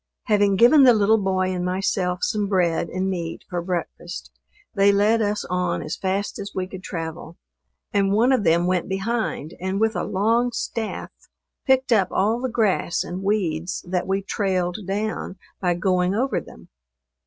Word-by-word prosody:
Having 205 -3 +3
given 245 +9 +6
the 250 -3 +7
little 215 +1 +4
boy 185 -1 0
and 180 -1 -2
myself 180 0 -1
some 210 -2 0
bread 175 -4 +1
and 185 +1 -2
meat 170 -3 -4
for 175 -2 -3
breakfast, 175 0 -5 0.4
they 200 -2 +4
led 210 +3 +3
us 210 0 -1
on 180 -1 -1
as 155 - -4
fast 195 +2 -2
as 200 0 -6
we 185 - -1
could 185 0 -9
travel, 165 -2 -6 0.6
and 200 -1 +2
one 230 +6 +3
of 255 -6 +2
them 170 0 +3
went 180 -1 0
behind 195 -5 -2
and 190 +2 -2
with 220 0 +1
a - - -1
long 230 +5 +1
staff, 225 -1 -4 0.6
picked 265 -1 +3
up 195 -5 +3
all 215 +5 +1
the 260 - -1
grass 215 -7 +1
and 180 +2 -6
weeds 185 -5 -1
that 180 0 -1
we 195 +1 0
trailed 185 -3 -1
down 205 -1 -3 0.2
by 180 -2 +1
going 180 +1 +1
over 260 +4 0
them. - - -15
195 Hz, 170 wpm, -23 LUFS, 180-215 Hz, 0.6 s, the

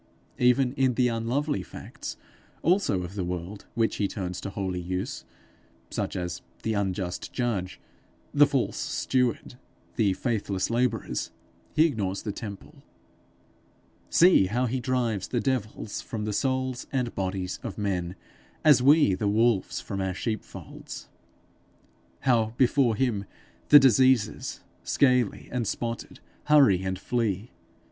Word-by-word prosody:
Even 125 +1 +3
in 130 -3 +1
the 125 0 +3
unlovely 120 +2 -1
facts - - -8 0.5
also 170 - +2
of 90 +2 -7
the 100 -2 -3
world 90 +3 -5
which 115 -1 +1
he 100 - +1
turns 90 -3 -5
to - - -4
holy 95 -2 -3
use, 90 +1 -4 0.7
such - - -3
as 90 -2 -4 0.2
the 110 - 0
unjust 95 -3 -2
judge, 105 -7 -2 0.5
the - - +6
false - - -1
steward, 125 -1 -1 0.4
the 105 -5 +3
faithless 100 -3 -1
labourers, 115 - 0 0.5
he 155 - +6
ignores 100 - -2
the 105 - -2
temple. 100 -2 -9 1.3
See 170 - +6
how 120 +6 0
he 130 +2 -1
drives 120 -6 -1
the 120 - -1
devils 110 -5 -2
from 110 -2 -5
the 105 - -2
souls 130 +2 -1
and 125 -3 -1
bodies 95 -1 -3
of 105 -5 -6
men, 95 -4 -2 0.5
as 145 -5 +7
we 145 -5 +5
the 100 +3 -1
wolves 110 0 +2
from 100 - -4
our 95 -1 -2
sheepfolds! 110 +1 -6 1.1
how 115 -3 +2
before 130 -2 +3
him 105 -4 0 0.4
the 150 - +11
diseases, 130 -4 +3 0.2
scaly 125 -5 +2
and 120 -3 -1
spotted, 115 0 -4 0.3
hurry 135 -12 +5
and 95 0 -2
flee! 110 0 -2
110 Hz, 130 wpm, -27 LUFS, 95-125 Hz, 1.3 s, the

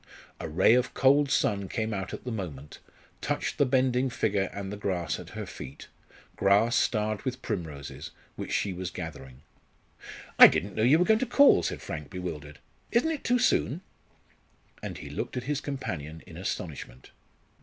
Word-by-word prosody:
A - - -5
ray 95 +8 +5
of 125 +1 +1
cold 140 +2 +4
sun 100 -6 +1
came 110 0 -2
out 95 -2 -4
at - - -7
the 125 - -4
moment, 80 -10 -6 0.4
touched - - -2
the 145 - +4
bending 130 0 +2
figure 100 -5 0
and 100 -1 -6
the - - -4
grass 95 -4 -2
at - - -10
her - - -4
feet 65 - -10 0.5
grass 100 +4 +3
starred 110 -3 +1
with 130 -1 -4
primroses, 80 - -5 0.3
which - - -6
she 100 - 0
was 90 0 -4
gathering. 65 -5 -8 1.0
"I - - +13
didn't 100 +2 -1
know 110 - -2
you 130 +7 +6
were 180 - +3
going 220 +1 +4
to 260 - -1
call," 280 - +6
said - - -4
Frank, 75 -2 -6
bewildered. 75 -5 -6 0.3
"Isn't 255 +8 +2
it 310 - -4
too 245 +1 +3
soon?" 185 - +1 1.0
And - - -6
he - - -9
looked - - -4
at 125 - -2
his 145 +2 -2
companion 80 - -5
in 85 - -12
astonishment. 80 -8 -6
105 Hz, 175 wpm, -28 LUFS, 85-130 Hz, 1.0 s, I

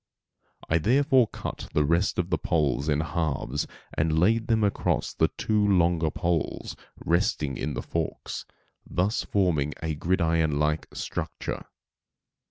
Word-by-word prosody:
I 80 - +2
therefore 130 - +4
cut - - -6
the 75 - +4
rest 85 +5 +2
of 90 0 -1
the - - +2
poles 75 -3 +1
in 75 0 +2
halves 75 -4 -2 0.3
and 80 +1 +1
laid 110 +7 +3
them 110 -2 +2
across 100 - 0
the - - +3
two 105 -1 +1
longer 85 -5 +3
poles 85 -1 -2 0.3
resting 85 - +1
in - - -3
the - - -3
forks, - - -4 0.4
thus 95 +5 0
forming 80 -7 +1
a 80 -1 -1
gridiron 80 -2 +1
like 75 +1 0
structure. - - -4
85 Hz, 135 wpm, -27 LUFS, 75-100 Hz, 0.4 s, therefore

